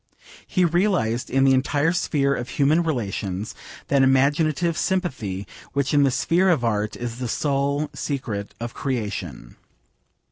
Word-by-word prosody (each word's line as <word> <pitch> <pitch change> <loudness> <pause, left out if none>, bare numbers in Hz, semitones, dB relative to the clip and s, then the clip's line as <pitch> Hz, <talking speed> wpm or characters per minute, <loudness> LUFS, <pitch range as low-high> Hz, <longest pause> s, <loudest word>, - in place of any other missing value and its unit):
He 185 -2 +2
realised 170 - +1
in 135 +1 +2
the 135 0 +5
entire 145 +4 +2
sphere 145 -5 +1
of 120 -2 -4
human 150 +6 +3
relations 105 - -3 0.4
that 140 -1 +4
imaginative 145 +5 +2
sympathy 130 - -2 0.3
which 140 0 0
in 145 - +5
the 140 - +4
sphere 175 +8 +2
of 150 -9 +2
Art 105 -2 0
is 120 0 -5
the 125 - -2
sole 140 +3 0
secret 115 -8 -4
of 120 0 -5
creation. 100 - -4
135 Hz, 140 wpm, -23 LUFS, 115-155 Hz, 0.4 s, the